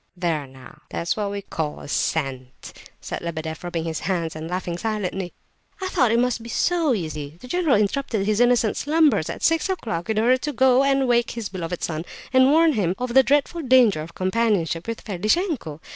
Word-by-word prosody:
"There 165 -5 -1
now, 130 -1 -15
that's 170 - -2
what 210 -2 -2
we 200 - -4
may - - -4
call 155 -5 -4
scent!" 135 -4 -3 0.3
said - - -5
Lebedeff, 160 -1 -5
rubbing 175 -2 -3
his 160 -2 -3
hands 170 -4 -2
and 155 +1 -6
laughing 175 -1 -3
silently. 195 -4 -3 0.5
"I 380 -1 -3
thought 250 -10 +2
it 230 - +3
must 245 -1 +1
be 230 - -9
so, 335 +3 +1
you 180 -8 -2
see. 150 0 -7
The 250 - -11
general 330 0 +2
interrupted 210 0 0
his 215 +1 +1
innocent 240 -3 +3
slumbers, 300 - +2
at - - -6
six 330 +3 +2
o'clock, 225 - -3
in 220 - 0
order 240 +4 +4
to 295 +3 -4
go 260 -1 +4
and 275 -1 +2
wake 240 -1 +2
his 225 -4 -4
beloved 180 -2 -5
son, 160 -1 -2 0.3
and 260 +1 +6
warn 320 +1 +5
him 190 -6 0
of 250 -1 -3
the 265 - +8
dreadful 290 +5 +1
danger 250 - +4
of 165 +2 -9
companionship 185 -4 0
with 230 0 -4
Ferdishenko. 215 - -1
215 Hz, 200 wpm, -23 LUFS, 170-260 Hz, 0.5 s, the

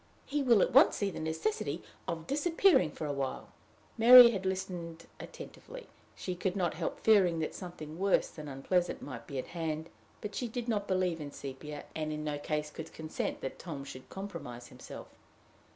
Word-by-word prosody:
He 295 +1 -1
will 235 -7 +5
at - - -1
once - - +7
see 200 -1 -1
the - - -6
necessity 160 0 -2 0.2
of 165 -1 -3
disappearing 310 - +3
for 155 - -6
a 145 - -1
while." 135 -1 -3 0.5
Mary 240 +1 +11
had 190 -3 -2
listened 180 -3 -4
attentively. - - -10 0.3
She 185 - -4
could 180 +1 -2
not 175 -4 0
help 160 +1 -4
fearing 195 -6 +5
that 160 -1 -2
something 165 -3 -8
worse 195 0 +3
than 155 -2 -9
unpleasant 175 +6 -1
might 115 -5 -8
be 140 - -5
at 130 - -4
hand; 160 -1 -3 0.3
but 210 - -6
she 245 - -2
did 235 +1 -5
not 205 -3 0
believe 185 -3 0
in 145 -1 -6
Sepia, 140 +3 -7
and 155 -1 -3
in 150 0 -4
no 150 -1 -2
case 150 0 -2
could 160 +1 -8
consent 160 0 -4
that 135 - -5
Tom 150 -5 -6
should 130 -2 -10
compromise 155 -12 -7
himself. - - -10
170 Hz, 185 wpm, -32 LUFS, 150-200 Hz, 0.5 s, Mary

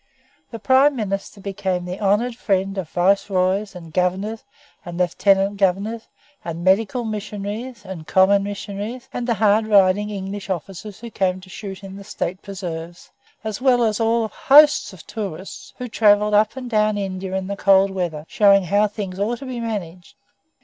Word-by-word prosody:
The 230 - -7
Prime 265 +5 +4
Minister 200 -2 -4
became 190 -2 -3
the 180 +2 -6
honoured 210 +5 +1
friend 195 -4 -1
of 170 -5 -5
Viceroys, 190 +2 +1
and 165 -3 -11
Governors, 190 +5 -1 0.4
and 175 -1 -7
Lieutenant 195 +3 +2
Governors, 200 +4 0 0.4
and 170 0 -5
medical 210 +6 +2
missionaries, 210 +2 -5
and 180 -5 -8
common 195 +1 +4
missionaries, 205 +4 -6
and 245 0 -3
hard 215 0 +3
riding 205 0 +4
English 200 0 -6
officers 190 +3 -6
who 235 -1 -8
came 185 -2 0
to 185 0 -14
shoot 195 -1 -8
in 195 0 -9
the 200 - -10
State 185 -2 -4
preserves, 175 -3 -7 0.3
as 220 +1 -4
well 250 -2 +4
as 215 -1 +1
of 225 - +2
whole 230 0 +1
hosts 295 +2 +5
of 185 -5 -14
tourists 195 -4 -7
who 250 - -5
travelled 210 -2 +3
up 210 +2 +3
and 255 -1 -6
down 215 -1 +2
India 190 -1 -4
in 190 0 -2
the 200 +1 -4
cold 195 0 +4
weather, 170 -5 -3
showing 200 -2 +4
how 205 +4 +2
things 200 -3 -6
ought 225 +4 0
to 275 - -9
be 255 -2 -5
managed. 185 -7 -5
200 Hz, 170 wpm, -21 LUFS, 190-215 Hz, 0.4 s, hosts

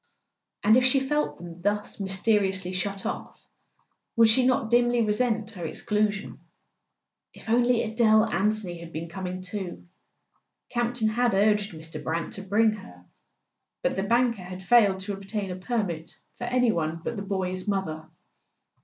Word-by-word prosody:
And 215 +2 +6
if 255 - +4
she 260 +1 +5
felt 295 +3 -1
them 175 0 -10
thus 205 +2 -1
mysteriously 195 -1 +1
shut 195 +1 -3
off - - -5 0.8
would 230 -1 +6
she 250 +4 +4
not 240 -3 +1
dimly 240 0 +4
resent 220 0 0
her 185 -6 -8
exclusion? 210 +5 -1 1.0
If - - -14
only 240 +1 +3
Adele 220 -1 +4
Anthony 195 -3 0
had 170 0 -10
been 165 +1 -5
com¬ 185 +1 -5
ing 185 +1 -5
too! 185 -1 -6 0.8
Campton 240 -2 0
had 235 -1 +1
urged 210 0 +2
Mr. 160 -1 -8
Brant 165 +2 -2
to 195 - -5
bring 210 +3 +3
her; 90 - -11 0.8
but - - +1
the 195 - 0
banker 235 +1 +2
had 185 +1 -8
failed 200 -4 +4
to 200 +1 -4
obtain 195 0 -4
a - - -4
permit 185 -5 -3 0.2
for 240 - -5
any 245 -1 +2
one 165 -2 -2
but - - -3
the 200 - -4
boy's 190 -1 -3
mother. 160 -6 -2
205 Hz, 155 wpm, -26 LUFS, 185-225 Hz, 1.0 s, And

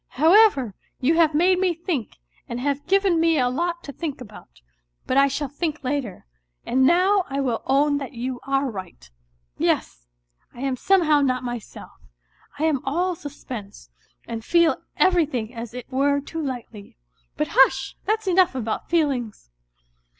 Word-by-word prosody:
However, 320 - +5 0.3
you 275 +5 +2
have 320 -3 +4
made 360 +3 +3
me 365 -2 +1
think 320 - -4 0.3
and 235 - -4
have 280 +2 -2
given 390 -2 +3
me 330 -1 +3
a 250 -2 +2
lot 340 +5 -2
to 280 - -7
think 295 0 -5
about; 205 - -13 0.5
but - - -1
I 275 0 +6
shall 280 +1 -2
think 300 +2 -4
later, 255 -6 -3 0.4
and 260 +1 +3
now 375 +4 +4
I 275 0 -2
will 250 -5 -1
own 285 +2 +2
that 275 -1 -7
you 250 +1 -4
are 275 0 0
right. 185 - -9 0.5
Yes, - - -1 0.5
I 240 - -9
am 270 -1 -1
somehow 310 -1 +3
not 255 -2 0
myself; 240 -3 -7 0.7
I 295 - -3
am 305 -5 +1
all 350 +7 0
suspense, 245 - -9 0.4
and 225 -1 -5
feel 340 +4 +3 0.2
everything 290 -11 +1
as 230 -1 -7
it 250 - -6
were 280 +2 +2
too 320 +3 -6
lightly. 240 - -7 0.4
But 150 - -1
hush! 265 0 +3
that's 440 0 0
enough 365 -5 +3
about 225 -4 -3
feelings. 265 - -1
280 Hz, 155 wpm, -23 LUFS, 250-330 Hz, 0.7 s, I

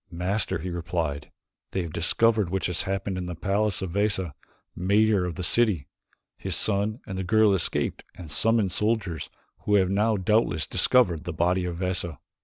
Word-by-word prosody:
"Master," 90 +5 -1
he 90 +2 -5
replied, 80 -4 -3 0.4
"they 95 - -1
have 80 -2 -7
discovered 105 +5 +2
that - - -9
which 95 0 -1
has 90 -1 0
happened 95 0 -3
in 90 - -4
the 90 - -5
palace 100 +3 -1
of 90 - -4
Veza, 100 -4 0 0.4
mayor 100 +1 +2
of 90 -2 -4
the 90 - -5
city. 100 - +2 0.5
His - - -1
son 105 +3 +1
and 95 -4 -5
the - - -2
girl 105 +2 +4
escaped 95 -4 0
and 85 -4 -10
summoned 110 +3 +2
soldiers 100 -9 -1 0.3
who 105 - +1
have 95 -2 +3
now 105 +2 +2
doubtless 95 -5 +1
discovered 90 -11 +2
the 85 - -4
body 90 +3 +1
of 85 -1 -4
Veza." 90 -4 -2
95 Hz, 180 wpm, -26 LUFS, 85-105 Hz, 0.5 s, girl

